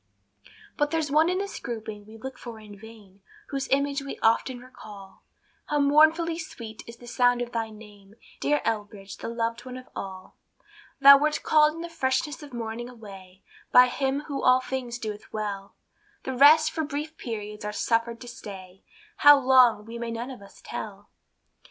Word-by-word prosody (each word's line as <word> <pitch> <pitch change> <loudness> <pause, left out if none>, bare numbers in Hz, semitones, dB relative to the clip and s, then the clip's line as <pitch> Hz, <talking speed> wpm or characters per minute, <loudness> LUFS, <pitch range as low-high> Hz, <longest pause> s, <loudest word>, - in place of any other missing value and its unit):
But 295 0 +1
there's 315 -2 -1
one 310 +3 +4
in 365 - 0
this 400 +1 -4
grouping 215 -3 -7
we 220 +1 -12
look 260 +3 -8
for 235 -2 -9
in 210 -1 -12
vain, 205 -2 -15 0.3
Whose 275 -1 -3
image 280 +1 +1
we 275 - -7
often 230 +3 +2
recall; 210 -6 -13 0.5
How 295 - 0
mournfully 315 +4 +4
sweet 230 -9 -8
is 230 0 -10
the 240 - -14
sound 245 0 +2
of 240 0 -4
thy 225 -2 -2
name, 210 -2 -15 0.2
Dear 295 0 +1
Elbridge, 205 -3 -4
the - - -7
loved 230 0 -3
one 255 0 -8
of 255 - -11
all. 190 -1 -8 0.7
Thou 280 0 +10
wert 300 +1 0
called 305 0 +4
in 330 - -7
the 340 - -5
freshness 295 -2 -1
of 290 -2 -11
morning 235 0 -5
away, 195 -5 -13 0.3
By 250 - +8
him 270 +2 -1
who 285 -2 -5
all 255 0 +5
things 255 -2 -4
doeth 215 -3 -7
well; 200 -2 -5 0.5
The 265 - -4
rest 310 +4 +6
for 320 - -2
brief 300 +2 -5
periods 210 -4 -6
are 210 - -3
suffered 230 +2 -1
to 245 - -9
stay, 195 -5 -10 0.4
How 290 0 +8
long, 255 -5 +5
we 230 +1 -8
may 235 0 -4
none 235 +3 -5
of 250 - -10
us 200 - -16
tell. 205 -1 -7
240 Hz, 180 wpm, -26 LUFS, 215-280 Hz, 0.7 s, Thou